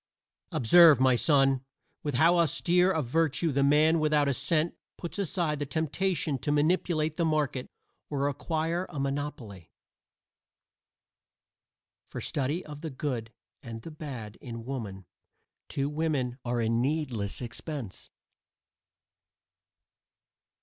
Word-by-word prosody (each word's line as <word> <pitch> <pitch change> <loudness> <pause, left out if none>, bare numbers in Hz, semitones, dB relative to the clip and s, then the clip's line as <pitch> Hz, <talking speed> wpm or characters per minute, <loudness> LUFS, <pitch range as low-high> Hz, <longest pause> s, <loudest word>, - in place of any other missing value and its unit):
Observe, 155 +3 +7
my 130 -1 +5
son, 135 -1 +3 0.4
with 145 -3 -3
how 170 +7 +5
austere 175 +3 +3
a 160 -5 0
virtue 160 +4 +1
the 140 0 +1
man 150 +4 +4
without 150 -2 +2
a 140 - +2
cent 155 +5 +1 0.2
puts 170 +3 -6
aside 170 -5 -1
the 145 - -1
temptation 160 0 -1
to 145 - -2
manipulate 155 0 +1
the 170 - +1
market 150 -5 0 0.4
or 140 -1 0
acquire 165 +5 -2
a 145 - -6
monopoly. 135 - -4 2.4
For - - -7
study 145 +6 -2
of 150 -1 -9
the 160 - -4
good 130 -5 -4 0.3
and 115 -4 -8
the 165 - -8
bad 130 -9 -7
in 115 -3 -7
woman 105 -8 -5 0.6
two 140 0 -1
women 145 -5 -1
are 120 0 -1
a 115 - +1
needless 120 -3 -1
expense. 125 - -6
145 Hz, 120 wpm, -29 LUFS, 130-160 Hz, 2.4 s, Observe